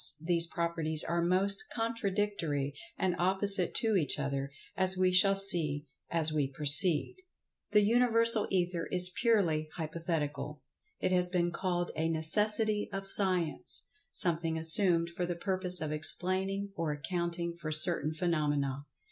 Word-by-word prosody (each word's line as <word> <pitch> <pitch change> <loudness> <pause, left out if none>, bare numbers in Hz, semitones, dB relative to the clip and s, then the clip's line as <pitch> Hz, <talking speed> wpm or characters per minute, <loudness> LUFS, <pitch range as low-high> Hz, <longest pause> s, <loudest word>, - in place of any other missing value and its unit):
these 170 +1 +2
properties 165 -2 -1
are 170 0 -2
most 190 +3 0
contradictory 200 - -3 0.2
and 185 -2 -1
opposite 190 0 -1
to 225 -3 0
each 155 -8 -1
other, 140 -1 -4 0.3
as 185 0 -1
we 185 0 +1
shall 195 +2 +3
see 165 -7 -2 0.2
as 160 -2 -1
we 145 -3 -1
proceed. 150 - +2 0.5
This 210 -1 +3
Universal 230 -1 +2
Ether 175 -2 -2
is 180 0 +6
purely 175 -10 0
hypothetical. 155 -3 -5 0.4
It - - -2
has 180 -1 +4
been 175 -1 -1
called 175 0 -3
a 160 +1 -2
"necessity 210 +6 +3
of 195 0 -6
Science"—something 175 - +1
assumed 170 0 +3
for 175 +1 -4
the 175 - -4
purpose 185 -1 +1
of 155 -1 -4
explaining 190 +6 -1
or 165 -2 -3
accounting 170 +3 -4
for 165 -2 -7
certain 155 0 +5
phenomena. 145 -4 -3
175 Hz, 130 wpm, -30 LUFS, 155-195 Hz, 0.5 s, is